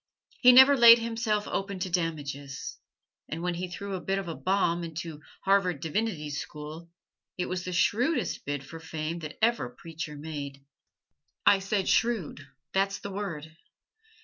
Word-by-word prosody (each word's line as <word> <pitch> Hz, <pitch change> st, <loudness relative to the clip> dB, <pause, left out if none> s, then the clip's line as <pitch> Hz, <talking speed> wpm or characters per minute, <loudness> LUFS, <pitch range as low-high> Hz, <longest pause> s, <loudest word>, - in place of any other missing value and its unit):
He 250 Hz, -, +8 dB
never 265 Hz, +3 st, +9 dB
laid 235 Hz, -2 st, +10 dB
himself 225 Hz, -2 st, -1 dB
open 195 Hz, 0 st, -3 dB
to 185 Hz, 0 st, -3 dB
damages. 145 Hz, -5 st, -3 dB, 0.5 s
And 165 Hz, +2 st, -4 dB
when 180 Hz, 0 st, 0 dB
he 180 Hz, +2 st, -4 dB
threw 195 Hz, +3 st, -6 dB
a 185 Hz, -, -3 dB
bit 195 Hz, 0 st, -1 dB
of 195 Hz, -2 st, -4 dB
a 165 Hz, -, -3 dB
bomb 175 Hz, -2 st, 0 dB
into 165 Hz, -2 st, -6 dB, 0.2 s
Harvard 190 Hz, -5 st, +3 dB
Divinity 160 Hz, -2 st, -2 dB
School 150 Hz, +3 st, -7 dB, 0.5 s
it 180 Hz, -, -1 dB
was 180 Hz, 0 st, -4 dB
the 180 Hz, -, -4 dB
shrewdest 240 Hz, -, +1 dB
bid 145 Hz, -1 st, -4 dB
for 165 Hz, +4 st, -9 dB
fame 160 Hz, +1 st, -4 dB
that 155 Hz, -2 st, -8 dB
ever 230 Hz, -, +2 dB
preacher 155 Hz, +3 st, -7 dB
made. 140 Hz, -2 st, -7 dB, 0.8 s
I 200 Hz, -1 st, +6 dB
said 195 Hz, 0 st, -1 dB
"shrewd" 190 Hz, -11 st, 0 dB, 0.3 s
that's 195 Hz, +1 st, +1 dB
the 200 Hz, -, -7 dB
word. 165 Hz, -6 st, -5 dB
175 Hz, 155 wpm, -28 LUFS, 155-200 Hz, 0.8 s, laid